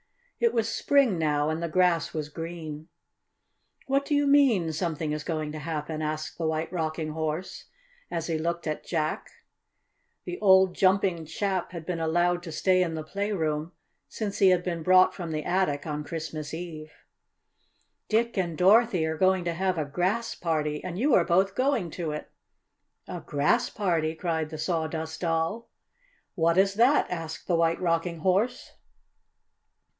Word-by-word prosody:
It 465 -1 +3
was 225 -1 +1
spring 245 -4 +2
now, 150 -1 +1
and 160 +1 -3
the 170 - -2
grass 180 -1 +2
was 155 -2 -2
green. 160 -1 -7 1.0
"What 275 +1 +1
do 295 - 0
you 285 0 +3
mean 265 - +4
something 155 -2 -2
going 155 -2 -3
to 155 - -6
happen?" 155 0 -4
asked 155 +1 -4
the 165 - 0
White 160 +2 -2
Rocking 155 -2 -2
Horse, 160 +3 -4 0.4
as 165 -2 -3
he 165 -2 -1
looked 170 +1 -2
at 155 -1 -3
Jack. 155 -3 -2 1.0
The 360 - -5
old 190 -2 +5
jumping 185 -3 +2
chap 185 +2 -2
had 170 -3 -7
been 175 -1 -3
allowed 175 +2 +1
to 170 -2 -8
stay 185 +3 +2
in 165 -3 -1
the 155 - -4
playroom 165 -4 -2 0.4
since 210 -3 -4
he 195 - +6
had 180 -1 +3
been 170 -2 -3
brought 185 +2 +5
from 170 -4 -6
the 155 -1 -2
attic 175 -6 0
on 150 -1 -3
Christmas 155 -1 -5
Eve. 160 -2 -7 1.2
"Dick 230 +2 +1
and 175 -5 -1
Dorothy 195 -2 +4
are 160 0 -2
going 190 -1 +3
to 170 - 0
have 185 +1 -1
a 155 - -1
Grass 185 +10 -1
Party, 150 -3 -2
and 180 -1 -5
you 265 +6 +2
are 180 - +6
both 190 +3 +2
going 255 - 0
to 170 -2 -4
it!" 150 - -6 0.8
"A - - -5
Grass 150 +13 +1
Party!" 165 -6 0
cried 160 -3 -2
the 155 - -7
Sawdust 160 0 -3 1.1
"What 170 -1 +2
is 195 +1 +4
that?" 245 +8 +4
asked 165 -2 -5
the 175 - +1
White 165 0 +2
Rocking 170 -1 -1
Horse. 195 +8 0
170 Hz, 160 wpm, -27 LUFS, 155-190 Hz, 1.2 s, he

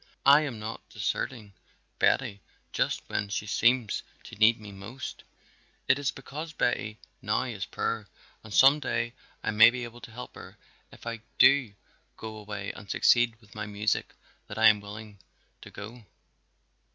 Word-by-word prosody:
I 140 +2 +8
am 140 -7 -3
not 110 +1 -7
deserting 110 -6 -3 0.5
Betty 100 0 +2 0.3
just - - 0
when 100 - -2
she 105 - -2
seems 115 +1 +2 0.2
to - - -11
need 110 +2 +5
me 105 -2 -10
most; 100 +7 -8 0.6
it 135 - +4
is 145 0 0
because 150 +3 -7
Betty 110 -5 -1 0.2
now - - +1
is - - -5
poor - - -2 0.4
and 110 - -12
some 135 +7 +7
day 120 -4 -2 0.3
I - - 0
may 110 +2 +8
be 125 +1 -4
able 120 0 -9
to - - -10
help 125 +3 -9
her - - -12 0.3
if - - -15
I 115 -1 -4 0.2
do 130 -7 +5 0.4
go 110 -1 -7
away 105 -2 -5
and 105 - -12
succeed 120 -2 +3
with 105 -2 -19
my 105 -1 -5
music 105 +1 -1 0.3
that 105 - -8
I 110 0 +8
am 105 -1 +3
willing 105 0 -10 0.4
to - - -10
go. 115 +3 -9
110 Hz, 165 wpm, -28 LUFS, 105-125 Hz, 0.6 s, I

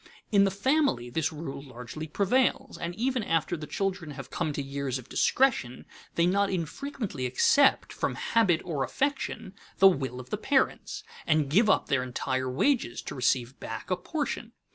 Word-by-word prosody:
In 200 -2 +6
the - - +3
family 210 - +1
this 160 +4 0
rule 150 -3 -6
largely 135 +3 -8
prevails, 250 - +1
and 170 +1 -5
even 255 +3 0
after 165 -2 0
the 155 -2 -7
children 185 -3 -2
have 135 - -8
come 165 -3 -1
to 145 - -2
years 135 -1 -3
of 130 -1 -11
discretion 230 - +1 0.3
they 170 - +3
not 200 +2 +2
infrequently 185 - -3
accept, 270 - +4
from - - -2
habit 195 -8 +2
or 150 -6 -1
affection, 265 - -2 0.2
the 195 - +8
will 135 -8 0
of 125 0 -11
the - - 0
parents, - - 0 0.2
and 150 -3 +2
give 210 +6 +5
up - - +3
their 140 -2 +1
entire 130 +1 -2
wages 150 - +1
to - - -6
receive 125 -1 0
back 110 +10 -6
a - - +4
portion. 240 - -4
170 Hz, 170 wpm, -28 LUFS, 135-220 Hz, 0.3 s, the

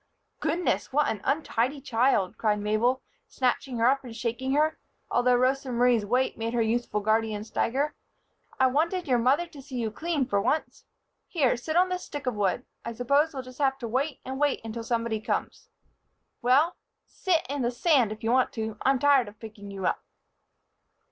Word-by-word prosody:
"Goodness! 320 +3 0
What 295 +2 +2
an 215 -3 -3
untidy 275 -2 0
child!" 230 -6 +1
cried 215 -1 +1
Mabel, 215 +5 +1 0.2
snatching 255 0 -1
her 230 +1 +3
up 270 +1 +2
and 240 -3 -9
shaking 250 +3 -2
her, 305 +2 +2 0.3
although 245 +1 +3
Rosa 260 +2 +1
Marie's 240 -3 +3
weight 250 +1 +1
made 230 +1 -2
her 235 - +2
youthful 220 -2 -1
guardian 215 0 0
stagger. 270 +6 -1 0.7
"I 260 - +5
wanted 325 +7 +1
your 250 -3 +3
mother 270 +8 +3
to 300 -5 -12
see 265 -1 -10
you 230 -3 -1
clean, 310 +1 -1
for 205 -5 0
once. 310 +9 -1 0.4
Here, 280 -9 +2
sit 310 +7 -4
on 365 +1 +4
this 365 0 -3
stick 290 -2 -7
of 250 - 0
wood. 205 +3 0 0.2
I 235 - -5
s'pose 280 +7 +2
we'll 260 - -4
just 255 +1 -13
have 270 -2 +2
to 245 -3 -5
wait 265 +5 -1
and 265 +1 -5
wait 290 -1 +1
until 225 +1 -5
somebody 230 -1 -1
comes. - - -3 0.7
Well, 275 +8 +3 0.3
sit 340 -4 0
in 280 0 -3
the 240 - +1
sand 250 - +2
if 215 +1 -8
you 225 - +1
want 255 0 +3
to. 220 -2 -4
I'm 270 0 +3
tired 275 -2 +4
of 205 +1 -12
picking 210 -2 -10
you 195 -2 -5
up." - - 0
250 Hz, 190 wpm, -27 LUFS, 225-280 Hz, 0.7 s, I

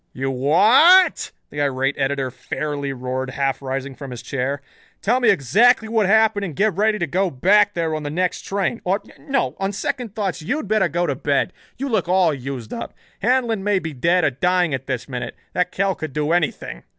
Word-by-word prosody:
"You 135 +1 -2
wha 215 - +6
a - - -2
t?" - - -7 0.2
the 145 - -3
irate 135 0 0
editor 135 -1 -1
fairly 140 +2 -4
roared, 130 0 -4
half 135 0 -1
rising 135 0 -4
from 140 +1 -9
his 125 -2 -8
chair. 140 +1 -3 0.4
"Tell 240 +5 +1
me 245 - +3
exactly 220 - +4
what 220 -3 +1
happened 220 0 +3
and 170 -7 -5
get 210 +5 +2
ready 215 +2 +2
to 175 - -1
go 185 +5 0
back 205 +9 +3
there 165 -2 -1
on 155 - -2
the 145 - -4
next 180 +4 -1
train. 200 +4 -2
Or 190 +3 0 0.2
no, 275 -2 -1
on 195 0 -1
second 245 0 -4
thoughts 195 -7 -2
you'd 250 - -3
better 215 -2 +2
go 175 +3 0
to 145 - 0
bed. 140 +6 0 0.2
You 275 - -3
look 215 -9 0
all 180 -3 +3
used 130 -4 -6
up. - - -6 0.3
Handlon 235 -3 +1
may 205 -1 +2
be 160 -4 -4
dead 170 +7 +2
or 145 - +3
dying 175 +4 +1
at 135 0 -4
this 130 -3 -3
minute. 125 -2 -5 0.2
That 180 0 0
Kell 195 0 0
could 155 -5 -7
do 150 +1 -1
anything." 160 - -1
175 Hz, 210 wpm, -21 LUFS, 135-205 Hz, 0.4 s, wha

